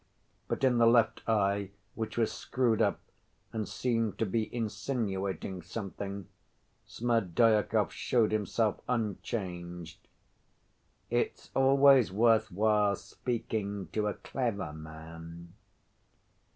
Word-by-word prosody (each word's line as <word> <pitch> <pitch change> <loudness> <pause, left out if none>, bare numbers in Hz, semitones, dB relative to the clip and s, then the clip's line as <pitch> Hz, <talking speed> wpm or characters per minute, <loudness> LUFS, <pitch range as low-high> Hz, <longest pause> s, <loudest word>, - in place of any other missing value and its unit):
But - - -3
in 125 -2 +4
the 115 - +6
left 115 -1 +4
eye, 100 -2 +1 0.2
which 110 0 -5
was 115 -2 +2
screwed 120 -4 0
up - - +2 0.5
and 110 -2 -2
seemed 115 -4 -1
to 115 - +1
be 110 +2 -1
insinuating 100 -5 -3
something, 100 +1 -6 0.6
Smerdyakov 115 -2 +2
showed 115 -4 +1
himself 110 0 0
unchanged. 90 -7 -3 1.1
"It's - - -1
always 135 -3 +5
worth 110 +1 +3
while 105 +1 +3
speaking 105 -6 -4
to 105 -1 0
a 105 - -2
clever 110 - -3
man." 80 +2 -10
105 Hz, 100 wpm, -30 LUFS, 95-115 Hz, 1.1 s, the